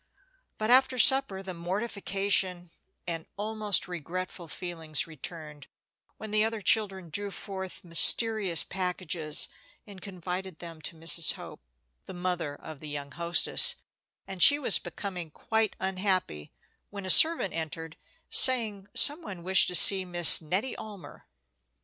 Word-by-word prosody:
But 215 +2 -3
after 260 0 +3
supper 235 -6 +2
the 190 -1 -7
mortification 190 -1 -3 0.3
and 165 -2 -7
almost 210 -1 -2
regretful 180 +1 -8
feelings 160 -2 -6
returned, 155 -2 -11 0.5
when 220 -1 -10
the 215 0 +1
other 225 0 -3
children 195 -5 -1
drew 205 +4 -6
forth 190 -1 -9
mysterious 185 +1 -1
packages, 180 -4 -3 0.4
and 200 -3 -14
confided 185 -1 -8
them 165 -2 -12
to 160 - -6
Mrs. 165 0 +1
Hope, - - -13 0.5
the - - -10
mother 175 -5 -5
of 155 0 -13
the 155 - -10
young 140 -1 -8
hostess; 170 - +2 0.5
and 190 -2 -9
she 285 +8 +5
was 265 -8 0
becoming 175 -1 -8
quite 220 +6 -3
unhappy 185 - -3 0.4
when 200 -1 -10
a 185 - +7
servant 320 - +6
entered, 160 0 -7 0.4
saying 220 -6 +6
some 295 +4 +8
one 190 - -10
wished 190 +1 +3
to 180 - -3
see 190 +3 +5
Miss 175 -2 +6
Nettie 190 +11 -3
Almer. 205 -4 -12
185 Hz, 135 wpm, -26 LUFS, 170-205 Hz, 0.5 s, some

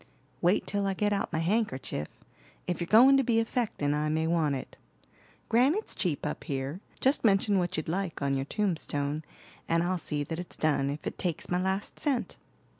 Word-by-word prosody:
"Wait 180 +3 +3
till 200 -1 -1
I 195 - 0
get 205 +1 +1
out 200 - -1
my - - -1
handkerchief; 165 - -1 0.6
if 180 -1 -2
you're 170 - -2
going 255 +7 +7
to 270 - +3
be 230 -2 +2
affectin' 225 - 0
I 150 +1 0
may 160 +1 +1
want 160 -4 +1
it. 130 - -7 0.7
Granite's 275 - +2
cheap 170 -8 -1
up 150 - -3
here; 140 +6 -3 0.2
just 270 +3 +2
mention 200 -2 +3
what 175 -2 -1
you'd 155 - -3
like 180 +1 -2
on 140 -1 0
your 135 0 -1
tombstone 155 -6 -1 0.5
and 165 0 +3
I'll 180 +1 0
see 150 -2 -1
that 160 +3 -5
it's 180 - -5
done, 145 -3 +1
if 145 +2 -5
it - - -5
takes 175 -3 -2
my 180 +1 +2
last 190 +2 -2
cent." 275 -5 -1
175 Hz, 190 wpm, -29 LUFS, 150-205 Hz, 0.7 s, going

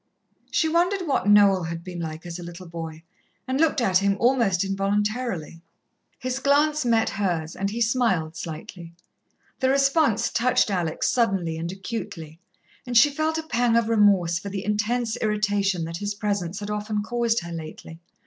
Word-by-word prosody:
She 320 - +1
wondered 355 +4 +1
what 270 - 0
Noel 200 -2 +6
had 165 +1 -5
been 180 -1 -7
like 160 0 -6
as 175 0 -6
a - - -7
little 175 +1 -9
boy, 165 -1 -7 0.4
and 260 +3 0
looked 320 -3 +3
at 190 -6 +3
him 200 0 +1
almost 230 -7 +2
involuntarily. 195 -2 -2 0.6
His 255 +1 -3
glance 295 +2 +2
met 230 -2 +2
hers, 175 -5 -2
and 195 0 -2
he 230 +3 -4
smiled 220 -9 +1
slightly. 165 +1 -8 0.7
The 260 - +2
response 275 -4 +2
touched 250 -2 +2
Alex 175 -4 -1
suddenly 195 -9 +1
and 165 +2 -4
acutely, 190 -5 -7 0.4
and 245 -1 0
she 290 +6 +7
felt 315 +2 -1
a 320 - -3
pang 245 -5 +1
of 230 -1 +1
remorse 195 -6 +3
for 200 - -7
the 195 -1 -5
intense 220 +2 0
irritation 205 -4 0
that 165 +1 -5
his 205 +2 -3
presence 200 -3 -2
had 205 0 -4
often 210 0 -2
caused 235 -1 0
her 170 0 -8
lately. 165 0 -8
205 Hz, 170 wpm, -24 LUFS, 175-240 Hz, 0.7 s, she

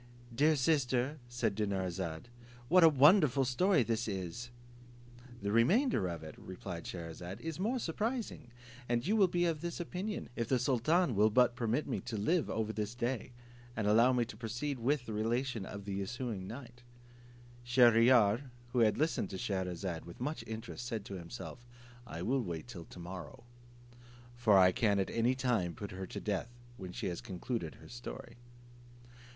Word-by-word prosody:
"Dear 150 +6 +4
sister," 135 -1 +1
said 120 -3 0
Dinarzade, 95 -4 -2 0.4
"what 180 +2 +7
a 165 - +10
wonderful 145 - +5
story 165 +6 +3
is 115 -1 0
this!" 100 +4 -4 0.9
"The 100 - 0
remainder 120 - +3
of 85 -2 -5
it," 80 - -8
replied 90 -2 -7
Scheherazade 85 +2 -6
"is 165 0 -5
more 225 +7 0
surprising, 225 - -3 0.4
and 120 +1 +1
you 210 - +2
will 200 -4 +5
be 175 0 +1
of 160 -3 0
this 170 +1 -4
opinion, 185 +5 -4
if 115 -2 -2
the 130 - +3
sultan 135 +6 +2
will 105 +2 +5
but 120 +2 +4
permit 120 +5 0
me 135 - -2
to 115 - -5
live 160 - +1
over 110 0 -1
this 105 +2 -3
day, 120 0 -2 0.4
and 110 - 0
allow 115 +5 +5
me 125 -2 +2
to 110 - -10
proceed 120 +5 -3
with 130 +2 +1
the 110 - -5
relation 115 0 -1 0.2
the 100 -1 -3
ensuing 100 -1 -4
night." 120 +2 -9 0.8
Shier 120 -1 +6
ear, 115 +1 +5 0.2
who 120 +1 0
had 110 -3 +4
listened 155 +3 0
to 95 - -5
Scheherazade 90 -3 -3
with 85 - -11
much 150 +6 -3
interest, 110 +2 -6
said 115 -4 -4
to - - -7
himself, 95 +7 -8 0.4
"I - - -5
will 130 +3 +1
wait 85 -2 -5
till 90 -9 -8
to - - -13
morrow, 85 +1 -8 0.9
for 110 -4 +5
I 90 -1 +7
can 105 +1 +2
at 95 - 0
any 120 +3 +2
time 115 -10 0
put 100 - -6
her 95 0 -6
to - - -6
death 105 +2 -2 0.3
when 95 -5 -7
she - - -5
has 85 - -5
concluded 110 -4 -4
her - - -14
story." - - -8
115 Hz, 170 wpm, -33 LUFS, 100-135 Hz, 0.9 s, a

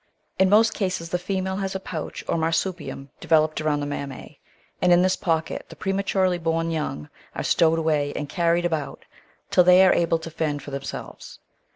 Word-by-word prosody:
In 190 0 +5
most 220 +3 +5
cases 185 -4 -2
the 180 - -1
female 190 +1 -2
has 195 -1 -3
a - - -1
pouch 165 -4 -6
or - - 0
marsupium 160 -4 -2
developed 155 -1 +2
around 150 -1 0
the - - -2
mammae, 140 -2 -7 0.4
and 180 - +4
in 175 +1 +6
this 185 0 +2
pocket 165 -2 -2
the - - -11
prematurely 190 -2 0
bom 165 0 -1
young 150 - -3 0.3
are - - -3
stowed 165 0 +3
away 155 -3 0
and 150 - -3
carried 170 +3 +1
about 160 -5 -3 0.5
till 180 - +6
they 180 +1 +7
are 185 - +5
able 165 -1 +2
to 165 0 -9
fend 150 -2 -2
for 145 - -9
themselves. 140 0 -7
165 Hz, 185 wpm, -24 LUFS, 155-185 Hz, 0.5 s, they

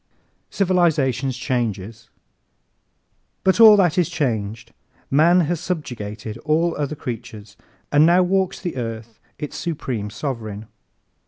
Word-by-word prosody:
Civilization's 150 -9 +1
Changes 115 -4 -3 1.3
¶ - - -47
But 190 +2 +2
all 220 -2 +9
that 180 -3 +3
is 175 - +1
changed. 115 -3 -3 0.4
Man 170 +6 +5
has 170 0 -1
subjugated 115 - -5
all 165 +2 +1
other 150 0 -3
creatures 110 -5 -8 0.4
and 145 +1 +5
now 175 +3 +5
walks 190 0 0
the 175 -7 -5
earth 115 -2 -6 0.2
its 150 - -6
supreme 130 -11 -4
sovereign. 110 -2 -5
135 Hz, 115 wpm, -21 LUFS, 110-170 Hz, 1.3 s, all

